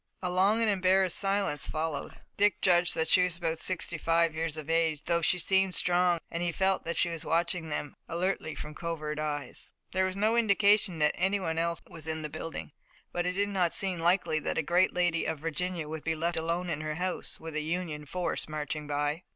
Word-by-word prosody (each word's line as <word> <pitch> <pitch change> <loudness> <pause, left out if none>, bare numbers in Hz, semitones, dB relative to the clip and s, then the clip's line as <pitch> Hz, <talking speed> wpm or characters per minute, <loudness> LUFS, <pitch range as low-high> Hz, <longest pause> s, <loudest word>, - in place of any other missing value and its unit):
A 180 - 0
long 195 +5 +3
and 225 - +2
embarrassed 190 -1 +2
silence 195 -7 0
followed. 155 -1 -3 0.2
Dick 205 +1 +3
judged 175 -1 +3
that 160 - 0
she 185 - +5
was 180 -2 -1
about 165 -2 -1
sixty 170 -3 +1
five 165 0 +2
years 160 -1 -2
of 155 -2 -6
age, 165 -2 +1
though 170 -1 +1
she 180 - +2
seemed 190 +1 +2
strong 175 0 +3
and 170 - -3
he 175 -1 0
felt 190 +2 0
that 170 - -2
she 175 - +3
was 165 -1 -5
watching 165 0 0
them 150 -1 -4
alertly 170 -1 -2
from 150 - -7
covert 155 -2 -4
eyes. 145 -3 -4 0.2
There 190 0 +1
was 185 0 -3
no 215 +3 +2
indication 205 -4 +3
that 150 -1 +3
anyone 185 -3 0
else 170 0 0
was 160 -1 -9
in 160 0 -3
the 150 - -4
building, 155 +1 -6 0.4
but 175 0 -1
it 180 - 0
did 200 +2 +1
not 185 -4 +1
seem 190 -3 +5
likely 170 -2 +2
that - - -3
a 165 - +1
great 175 +4 +3
lady 175 -2 +1
of 160 - -2
Virginia 165 +1 -3
would 155 0 -6
be 160 0 0
left 170 +2 -1
alone 170 +2 -1
in 150 - -2
her 155 0 -3
house, 180 +2 -3
with 160 -1 -7
a 155 - -1
Union 155 -2 -3
force 175 -1 -2
marching 150 0 -4
by. 145 +2 -1
170 Hz, 215 wpm, -29 LUFS, 160-185 Hz, 0.4 s, she